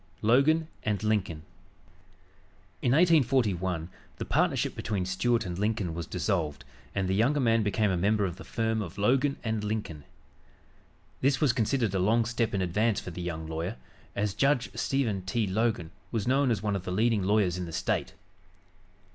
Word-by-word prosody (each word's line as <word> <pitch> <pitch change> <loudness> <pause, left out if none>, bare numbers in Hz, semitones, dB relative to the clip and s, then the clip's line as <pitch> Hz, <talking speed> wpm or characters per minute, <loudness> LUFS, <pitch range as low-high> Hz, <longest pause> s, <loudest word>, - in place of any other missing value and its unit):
LOGAN 140 +8 +4
& - - -32
LINCOLN 105 -6 -1 1.4
In 120 - +2
1841 120 - +2 0.3
the - - -4
partnership - - +1
between 100 -4 -2
Stuart 115 +6 +1
and 90 0 -4
Lincoln 105 -5 -1
was 85 0 -5
dissolved 85 -6 -2 0.3
and 95 -2 0
the 95 - 0
younger 125 +9 +2
man 115 -3 +3
became 105 0 +1
a 90 - 0
member 105 +3 +2
of 90 -2 -4
the - - -9
firm 110 -1 -1
of 90 -2 -7
Logan 130 +7 +2
& - - -14
Lincoln. 105 -8 -3 1.2
This 135 +1 +2
was 140 -6 +3
considered 115 -3 0
a 95 - +1
long 110 +5 +3
step 115 -2 -1
in 95 - 0
advance 105 +5 +1
for 90 - -7
the 90 - -7
young 80 -2 -4
lawyer, 80 +6 -4 0.4
as 100 -1 0
Judge 135 0 +1
Stephen 120 -8 0
T. 100 +5 -1
Logan 100 -4 -1 0.2
was 115 -2 -2
known 135 +1 +3
as 110 -3 0
one 105 -2 0
of 95 - -3
the 90 - -4
leading 110 +2 +2
lawyers 95 -2 +2
in 90 - -3
the - - -7
State. - - -2
105 Hz, 170 wpm, -28 LUFS, 95-120 Hz, 1.4 s, LOGAN